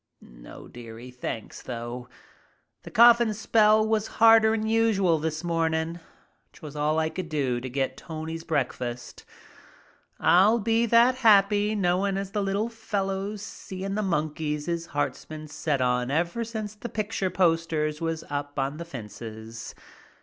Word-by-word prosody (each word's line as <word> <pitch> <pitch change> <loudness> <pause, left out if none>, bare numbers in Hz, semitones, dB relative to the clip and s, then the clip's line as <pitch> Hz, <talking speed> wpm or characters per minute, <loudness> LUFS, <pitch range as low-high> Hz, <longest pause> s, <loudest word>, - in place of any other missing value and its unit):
"No, - - -13
dearie, 120 +1 -10
thanks 125 -3 -6
though. 120 0 -6 0.7
The - - -10
coughin' 235 -1 +6
spell 215 0 +4
was 220 -1 0
harder'n 225 -1 +5
usual 215 -7 +2
this 155 +1 -3
mornin'. 165 0 -1 0.5
'Twas 150 -2 -10
all 150 +2 +1
as 160 - +1
I - - -1
could 180 0 -6
do 135 -6 -1
to 130 - -5
get 135 0 -2
Tony's 160 0 -6
breakfast. 125 -5 -3 1.0
I'll 200 +6 +5
be 230 +1 +1
that 235 +3 +5
happy 210 -2 +4
knowin' 195 0 +1
as 195 -1 -4
the 205 - -1
little 200 +3 0
fellow's 205 -2 -3
seein' 195 -1 -6
the 215 - -1
monkeys 150 -4 -2
his 170 -1 -3
heart's 145 -2 -2
been 155 0 -8
set 150 -2 -2
on 125 0 +1
ever 170 +10 0
since 220 -2 -5
the 215 +3 -8
picture 210 -2 -2
posters 165 -4 0
was 165 -1 -2
up 145 0 -5
on 135 +2 -1
the 170 - -6
fences." 115 -4 -9
170 Hz, 145 wpm, -26 LUFS, 145-210 Hz, 1.0 s, coughin